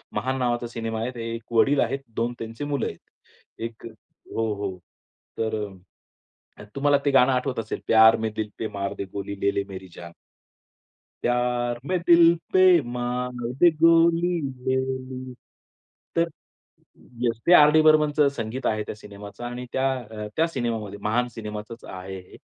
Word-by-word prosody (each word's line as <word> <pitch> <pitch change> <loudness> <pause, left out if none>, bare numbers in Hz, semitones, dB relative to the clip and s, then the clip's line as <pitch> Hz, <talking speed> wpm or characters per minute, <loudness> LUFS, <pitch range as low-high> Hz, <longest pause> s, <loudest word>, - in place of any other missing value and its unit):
महान 130 +1 -1
नावाचा 120 -1 0
सिनेमा 115 -1 -4
आहे, 120 +2 -2
ते 115 -1 -5
1 115 0 -10
वडील 135 +5 +4
आहेत, 135 +4 0 0.2
2 120 +1 -1
त्यांची 115 +4 -6
मुलं 145 -1 -1
आहेत. - - -7 0.6
एक 115 0 -6
हो, 110 0 -5
हो. 100 -2 -4 0.6
तर 110 -1 -1
अ, 100 - -10 0.9
अ, - - -9
तुम्हाला 145 +1 +3
ते 140 - +3
गाणं 135 -1 +5
आठवत 125 -1 -1
असेल, 110 -1 -4
प्यार 110 0 +7
में 110 0 -2
दिल 110 -1 -3
पे 110 - -2
मार 100 0 -2
दे - - -4
गोली, 100 0 -4
ले 100 - +3
ले 100 - +1
मेरी 95 -1 -8
जान. 85 -1 -9 1.1
प्यार 120 0 0
में 185 +4 0
दिल 170 0 +7 0.2
पे 185 -3 +6
मार 125 +1 -2 0.3
दे 175 - +8
गोली 165 +1 +5
ले 130 -2 -2
ले, 130 -1 -5 0.8
तर 170 0 +2 0.9
येस, 115 -2 0
ते 175 - +7
आर. 150 -3 +8
डी. 155 +1 +5
बर्मनचं 150 -2 +4
संगीत 120 +1 -5
आहे 110 -1 0
त्या 105 - -7
सिनेमाचं 105 +1 -11
आणि 120 +1 -5
त्या 130 0 +1 0.3
अ, 105 -1 -5
त्या 165 +1 +3
सिनेमामध्ये 115 -8 -3
महान 120 +4 +1
सिनेमाचाच 105 +1 -7
आहे 95 +1 -7
हे - - -13
120 Hz, 165 wpm, -25 LUFS, 110-140 Hz, 1.1 s, दे